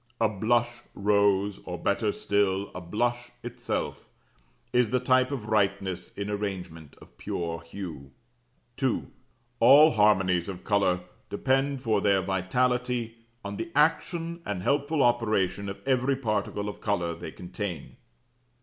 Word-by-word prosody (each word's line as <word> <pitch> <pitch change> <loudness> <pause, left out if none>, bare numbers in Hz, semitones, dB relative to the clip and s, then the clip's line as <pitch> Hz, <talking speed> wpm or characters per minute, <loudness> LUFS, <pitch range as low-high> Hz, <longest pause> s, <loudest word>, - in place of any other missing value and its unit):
A 115 - +4
blush 115 +4 +1 0.2
rose 100 -1 +2
(or, 90 -1 -5
better 100 +4 0
still, 100 -1 0
a 90 - -6
blush 120 +7 -1
itself), 120 0 -4 0.7
is 125 -2 +3
the 125 +2 +2
type 130 +1 +3
of 130 -7 -4
rightness 95 -4 0
in 100 0 -4
arrangement 95 -7 -5
of - - -18
pure 85 -1 -3
hue. 85 -5 -8 0.7
2. 130 -3 -1 0.5
ALL 140 +7 +8
HARMONIES 95 -5 +3
OF 95 -2 -7
COLOUR 95 -3 +2 0.3
DEPEND 135 +4 0
FOR 110 -3 +2
THEIR 100 -2 +3
VITALITY 120 +5 0 0.3
ON 100 0 -5
THE 170 - -5
ACTION 165 +2 +1
AND 95 - -4
HELPFUL 145 +3 +1
OPERATION 105 -5 +1
OF 100 - -6
EVERY 130 +1 +2
PARTICLE 105 -4 -2
OF 105 - -7
COLOUR 90 -5 0
THEY 85 - -8
CONTAIN. 90 -3 -6
105 Hz, 130 wpm, -27 LUFS, 95-125 Hz, 0.7 s, ALL